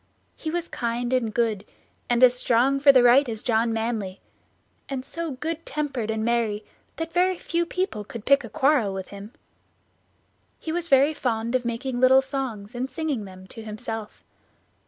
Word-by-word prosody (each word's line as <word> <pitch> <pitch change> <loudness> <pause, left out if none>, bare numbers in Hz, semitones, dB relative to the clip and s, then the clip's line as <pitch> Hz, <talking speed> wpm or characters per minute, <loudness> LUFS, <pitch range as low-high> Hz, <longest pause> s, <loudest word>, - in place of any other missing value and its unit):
He 315 - -5
was 345 +1 -2
kind 240 +1 -2
and 240 -4 +1
good, 220 -3 0 0.5
and 240 +1 +3
as 250 -1 +8
strong 250 +2 +2
for 280 0 +8
the 255 -2 +5
right 250 +2 +6
as 220 -2 -4
John 230 -1 +2
Manly; 220 -4 -2 0.7
and 265 -2 -4
so 335 0 -4
good 320 +5 -4
tempered 275 -7 -3
and 220 0 -1
merry 225 -3 0 0.3
that 325 0 -5
very 365 +1 +2
few 340 0 -1
people 365 - -2
could 215 +1 -9
pick 280 0 +4
a 230 - -8
quarrel 255 -6 +2
with 190 -1 -6
him. 200 +2 -9 1.3
He 320 - -4
was 340 0 -2
very 275 +3 +5
fond 235 -4 -2
of 255 -1 +1
making 245 +2 -2
little 260 +1 +6
songs, 260 -6 -4
and 250 +2 -3
singing 275 -5 -3
them 185 -1 -12
to 225 - -9
himself. 220 0 -6
245 Hz, 175 wpm, -25 LUFS, 225-280 Hz, 1.3 s, as